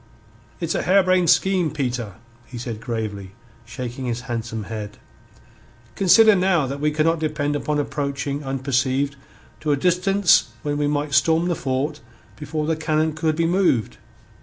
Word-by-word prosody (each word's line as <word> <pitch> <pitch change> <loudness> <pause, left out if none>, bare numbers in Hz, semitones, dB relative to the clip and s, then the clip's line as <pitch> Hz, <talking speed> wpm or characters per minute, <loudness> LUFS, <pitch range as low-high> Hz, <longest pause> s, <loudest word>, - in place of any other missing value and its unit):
"It's 170 -2 -2
a - - 0
harebrained 185 -2 +3
scheme, 185 -1 +3
Peter," 125 -8 -3 0.3
he 125 - -9
said 115 -2 -6
gravely, 105 -5 -5 0.3
shaking 125 +2 -6
his 120 0 -2
handsome 115 -3 -4
head. 105 -1 -7 1.0
"Consider 205 - +6
now 180 -5 +2
that 140 +2 -5
we 150 +1 +1
cannot 155 +2 +1
depend 150 -2 -1
upon 150 +1 -1
approaching 140 0 -3
unperceived 135 +1 -1 0.4
to 155 - -1
a 145 - +2
distance 180 +4 +3
whence 145 -1 -2
we 145 - +1
might 145 0 -1
storm 165 +4 +3
the 175 - 0
fort 145 +2 -2 0.4
before 150 +1 -4
the 160 +1 0
cannon 155 0 0
could 155 0 0
be 165 +1 +1
moved. 170 - +1
145 Hz, 150 wpm, -22 LUFS, 130-165 Hz, 1.0 s, Consider